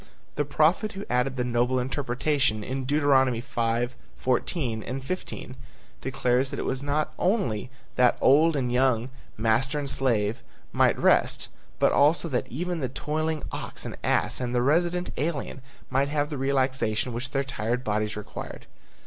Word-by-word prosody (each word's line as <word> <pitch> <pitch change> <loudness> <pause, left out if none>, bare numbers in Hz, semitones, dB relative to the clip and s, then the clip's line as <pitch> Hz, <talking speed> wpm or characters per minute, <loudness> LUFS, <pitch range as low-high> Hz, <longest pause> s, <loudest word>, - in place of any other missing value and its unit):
The 145 - -1
prophet 155 +8 +2
who 195 +1 -6
added 125 +2 +1
the 125 - +1
noble 125 +1 +1
interpretation 130 -2 0
in 130 +3 -3
Deuteronomy 135 -4 +3
5:14, 120 - -2
15, 135 -5 -5 0.5
declares 130 0 +1
that - - -5
it - - -3
was 130 0 -1
not 145 +2 -1
only 125 - 0 0.3
that 125 -1 +4
old 155 +4 +5
and 125 -3 0
young, 125 -1 +2 0.3
master 115 +7 +2
and 145 -1 -2
slave, 115 -4 0 0.3
might - - +3
rest, - - +2 0.3
but - - +4
also 155 +4 +3
that 125 -4 -1
even 175 +6 -3
the 130 -4 -2
toiling 155 +3 -2
ox - - -6
and - - -5
ass - - +1
and 125 0 -2
the 120 - +3
resident 175 +5 +1
alien 145 -2 -2 0.3
might 135 +2 +2
have 145 0 -1
the 145 - -3
relaxation 130 -4 0
which 120 +2 -3
their 135 +1 0
tired 120 -1 -2
bodies 105 -1 -1
required. 105 - -7
130 Hz, 150 wpm, -26 LUFS, 120-145 Hz, 0.5 s, old